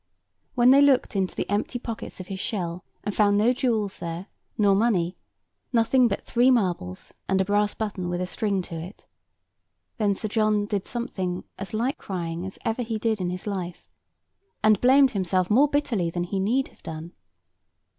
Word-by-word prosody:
When 245 0 +6
they 275 +1 +7
looked 275 -6 +3
into 190 -2 0
the - - -2
empty 205 +5 -1
pockets 230 -4 -7
of 185 - -6
his 190 +1 -6
shell, 180 -4 -3 0.2
and 205 - -2
found 205 -1 +3
no 225 +4 +4
jewels 225 -6 -1
there, 170 +3 -5 0.3
nor 205 -2 +4
money—nothing 225 +4 0
but 200 - -2
three 245 +2 +3
marbles, 180 - 0 0.2
and 190 0 +2
a 190 - +2
brass 205 +1 +1
button 200 -5 -3
with 175 0 -2
a 180 - -1
string 195 0 -1
to 175 - -8
it—then 200 +3 -7
Sir 215 - -3
John 215 -1 +2
did 205 -2 -3
something 190 -7 -3 0.2
as 195 +2 -5
like 255 +8 -1
crying 175 -1 -4
as 190 - -9
ever 225 +1 0
he 225 -2 -2
did 220 -2 0
in 180 - -1
his 180 0 -5
life, 185 -4 -5 0.7
and 215 -2 +4
blamed 265 +1 +6
himself 185 -2 0
more 270 +7 +6
bitterly 255 -12 0
than 175 +1 -2
he 190 +2 -2
need 240 +8 +1
have - - -25
done. 160 +2 -7
205 Hz, 175 wpm, -25 LUFS, 185-230 Hz, 0.7 s, they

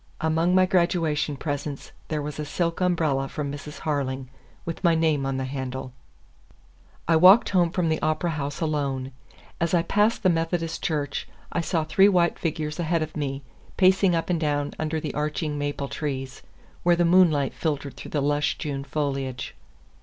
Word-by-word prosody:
Among 165 +3 +2
my 185 0 +6
graduation 170 -6 +1
presents 145 -1 -4 0.2
there 150 -2 -2
was 150 0 -6
a - - -1
silk 170 +3 -2
umbrella 155 -7 +1
from 145 -2 -4
Mrs. 145 +1 -8
Harling, 135 -4 -2 0.4
with 165 +3 -5
my 170 -2 +4
name 155 -4 +1
on 135 -1 -1
the 130 - -2
handle. 130 -1 -5 1.1
I 165 - +4
walked 185 +8 +7
home 180 -3 +3
from 175 0 0
the 160 0 0
Opera 155 +2 0
House 145 -1 -4
alone. 140 -4 -1 0.5
As 170 +1 +1
I 170 - +3
passed 210 +6 +1
the 185 - +5
Methodist 165 0 -1
Church, 145 -3 -2 0.2
I 170 - 0
saw 165 -1 0
three 190 +6 +5
white 175 -3 +2
figures 155 -1 -3
ahead 165 -1 +1
of 155 - -7
me, 140 -2 -3 0.3
pacing 190 -1 +4
up 165 +2 -1
and 170 - +1
down 145 -1 0
under 155 0 -1
the 155 - -4
arching 150 0 -2
maple 145 -1 -2
trees, 135 +1 -4 0.4
where 175 0 +4
the 175 0 +2
moonlight 170 -6 +4
filtered 145 -3 -3
through - - -9
the 145 - -1
lush 145 +1 +1
June 140 -3 -4
foliage. 135 -4 -3
155 Hz, 175 wpm, -25 LUFS, 145-170 Hz, 1.1 s, walked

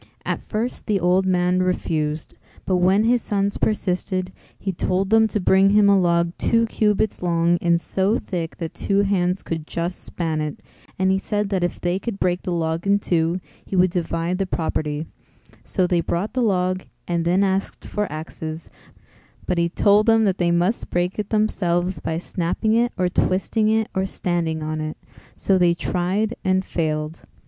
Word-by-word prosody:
At - - -2
first 230 +3 -3
the 205 -3 +2
old 180 +2 +2
man 180 0 +2
refused, 155 -4 -1 0.3
but 185 - +1
when 190 +4 +3
his 240 +1 +3
sons 200 -1 -1
persisted, 185 -2 -1 0.2
he 195 - -3
told 185 +2 -1
them 220 0 +5
to 215 - -1
bring 190 +1 +4
him 205 0 +5
a 200 -1 +5
log 170 -1 +2
two 230 0 +3
cubits 215 -1 0
long 170 0 +2
and 170 -1 +3
so 195 +6 0
thick 170 -4 -5
that 165 -2 -5
two 200 0 +1
hands 185 -2 0
could 160 -2 -4
just 170 +2 -3
span 160 -3 -2
it, 150 -1 -5 0.3
and 190 0 +2
he 190 - +2
said 205 0 -2
that 190 -3 0
if 175 - -2
they 175 +2 -1
could 200 -1 -5
break 180 0 +1
the 180 - -4
log 165 +1 -1
in 200 0 +4
two, 170 -2 0 0.2
he - - -5
would 180 -1 +4
divide 170 +1 -1
the 195 - 0
property; 155 -3 -2 0.6
so 185 - 0
they 175 -1 +2
brought 175 +5 -2
the 255 - 0
log 185 -4 0 0.2
and 170 -1 0
then 180 +4 +2
asked 195 0 -1
for 210 -4 -3
axes, 155 +1 -7 0.7
but 180 -1 0
he 170 0 +2
told 205 +4 +3
them 225 -1 +5
that 195 -2 0
they 175 -1 +2
must 175 +6 +1
break 175 +3 -1
it 205 - -3
themselves 180 -5 0
by 160 - -3
snapping 175 +5 -1
it 240 +1 +2
or 185 -1 +2
twisting 195 +4 +1
it 220 0 +2
or 190 -1 0
standing 170 -4 -2
on 155 0 -3
it; 155 0 -4 0.4
so 190 -1 +2
they 175 -1 +4
tried 190 +6 -1
and 190 0 +1
failed. 155 -1 -3
185 Hz, 185 wpm, -22 LUFS, 170-200 Hz, 0.7 s, them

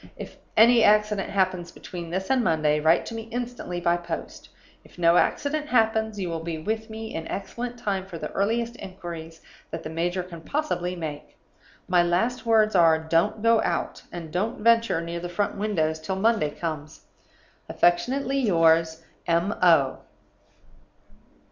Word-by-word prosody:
If - - -9 0.2
any 230 +1 +7
accident 210 -2 +3
happens 185 -3 0
between 175 -2 -8
this 190 +5 -3
and 260 -2 +3
Monday, 155 -4 +2
write 160 +2 +3
to - - -7
me 225 -1 -6
instantly 240 -7 -4
by 175 0 +2
post. 170 -1 -7 0.3
If - - -20
no 170 -1 +4
accident 300 +7 0
happens 220 -4 +1
you 185 - -2
will 165 -1 -3
be 165 -1 -4
with 220 +7 -3
me 220 0 -7
in 160 - -5
excellent 240 +4 -5
time 195 -5 -2
for 175 - -7
the 155 -1 -6
earliest 230 +4 -1
inquiries 170 -4 -8 0.3
that - - -6
the 155 - -6
major 175 +3 -1
can 170 -2 -10
possibly 180 - -2
make. 155 -4 -7 0.5
My 180 -1 +4
last 205 +9 0
words 220 -1 +4
are, 165 -2 +6
don't 165 +7 0
go 230 -1 +4
out, - - -2
and 165 -3 -8
don't 210 +4 -2
venture 230 -6 +3
near 170 0 -5
the 175 +1 -5
front 200 +4 -1
windows 165 -7 -1
till 160 +4 -3
Monday 210 -5 +2
comes. 155 -1 -6 0.7
"Affectionately 265 +10 +1
yours, 165 -6 +3 0.2
"M. 170 +4 +1
O." 160 -7 +4
180 Hz, 160 wpm, -25 LUFS, 165-220 Hz, 0.7 s, any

